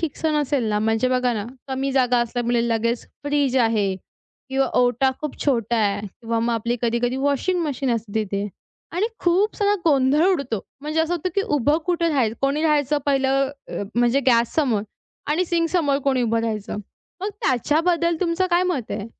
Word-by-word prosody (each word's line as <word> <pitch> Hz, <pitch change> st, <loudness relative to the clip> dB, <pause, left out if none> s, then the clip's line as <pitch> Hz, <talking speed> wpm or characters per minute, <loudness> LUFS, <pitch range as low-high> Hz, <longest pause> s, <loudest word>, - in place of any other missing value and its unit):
ठीकसं 320 Hz, -1 st, -1 dB
नसेल 280 Hz, -3 st, 0 dB
ना, 210 Hz, -1 st, +1 dB
म्हणजे 225 Hz, +3 st, +1 dB
बघा 250 Hz, -1 st, +1 dB
ना, 205 Hz, -2 st, -3 dB, 0.2 s
कमी 270 Hz, +1 st, -1 dB
जागा 250 Hz, -2 st, +3 dB
असल्यामुळे 240 Hz, 0 st, 0 dB
लगेच 230 Hz, +1 st, 0 dB, 0.2 s
फ्रिज 285 Hz, -3 st, +1 dB
आहे 220 Hz, -5 st, +2 dB, 0.5 s
किंवा 270 Hz, 0 st, +1 dB
ओटा 245 Hz, +2 st, +3 dB
खूप 300 Hz, -2 st, -5 dB
छोटा 235 Hz, -4 st, +1 dB
आहे 210 Hz, -1 st, 0 dB
किंवा 230 Hz, +3 st, -4 dB
मग 235 Hz, +1 st, 0 dB
आपली 235 Hz, +2 st, -1 dB
कधी-कधी 240 Hz, +2 st, 0 dB
वॉशिंग 285 Hz, +7 st, 0 dB
मशीन 275 Hz, -3 st, -1 dB
असते 220 Hz, -2 st, -5 dB
तिथे, 200 Hz, 0 st, -3 dB, 0.5 s
आणि 370 Hz, +6 st, +1 dB
खूप 370 Hz, +5 st, +2 dB
सगळा 410 Hz, -1 st, +2 dB
गोंधळ 290 Hz, +1 st, +4 dB
उडतो. 270 Hz, -, -2 dB, 0.2 s
म्हणजे 305 Hz, +2 st, -1 dB
असं 325 Hz, +2 st, 0 dB
होतं, 350 Hz, +1 st, -2 dB
की 395 Hz, -, +2 dB
उभं 295 Hz, -, +1 dB
कुठे 345 Hz, -2 st, +1 dB
राहायचं? 255 Hz, -8 st, +1 dB
कोणी 280 Hz, +3 st, +1 dB
राहायचं 295 Hz, -2 st, +2 dB
पहिलं 270 Hz, -1 st, +2 dB, 0.2 s
अ, -, -, -4 dB
म्हणजे 240 Hz, +3 st, +3 dB
गॅस 235 Hz, -2 st, +3 dB
समोर? 250 Hz, -10 st, +1 dB, 0.4 s
आणि 310 Hz, +5 st, +1 dB
सिंकसमोर 330 Hz, -4 st, +1 dB
कोणी 265 Hz, -2 st, +2 dB
उभं 230 Hz, -1 st, +1 dB
राहायचं? 215 Hz, -3 st, -3 dB, 0.4 s
मग 395 Hz, -, -2 dB
त्याच्याबद्दल 330 Hz, +6 st, +2 dB
तुमचं 365 Hz, +1 st, +1 dB
काय 350 Hz, +1 st, +4 dB
मत 340 Hz, -11 st, -2 dB
आहे? 205 Hz, -, -4 dB
265 Hz, 170 wpm, -22 LUFS, 235-310 Hz, 0.5 s, गोंधळ